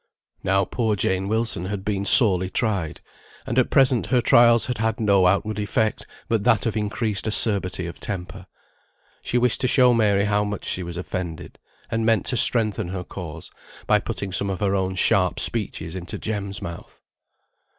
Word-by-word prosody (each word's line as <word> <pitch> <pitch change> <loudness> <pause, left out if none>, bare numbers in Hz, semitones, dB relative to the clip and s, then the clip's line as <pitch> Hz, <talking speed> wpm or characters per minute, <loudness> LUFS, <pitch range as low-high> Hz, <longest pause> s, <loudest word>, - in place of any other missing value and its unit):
Now, 95 0 +1
poor 110 -1 -2
Jane 95 0 -2
Wilson 110 -4 -2
had 100 0 -6
been 100 -2 -3
sorely 95 -6 +8
tried; 95 -7 -3 0.4
and - - -1
at - - 0
present 130 -4 +2
her 125 +3 +1
trials 120 -1 +4
had 125 -3 -5
had 110 +1 -2
no 100 -4 +2
outward 105 +3 -1
effect, 105 +1 -2 0.2
but 115 -2 -1
that 115 -3 +1
of 115 - -2
increased 105 -1 -2
acerbity 100 -4 +4
of 85 - -9
temper. 95 -1 -7 0.7
She 125 - -2
wished 125 -1 +1
to 130 - +1
show 125 0 +4
Mary 100 -3 +1
how 105 0 0
much 105 -1 -6
she 95 - -1
was 85 -1 -7
offended, 90 -2 -7 0.3
and 115 -1 -2
meant 110 -4 +1
to 125 - 0
strengthen 110 -7 +3
her 90 0 -6
cause, 85 -4 -10 0.3
by - - +2
putting 100 -1 -6
some 100 +2 0
of 95 - -4
her 100 -2 -1
own 95 -1 -2
sharp 90 - +1
speeches 80 +2 -2
into 90 -1 -7
Jem's 100 -3 -5
mouth. 85 0 -10
100 Hz, 175 wpm, -22 LUFS, 95-110 Hz, 0.7 s, sorely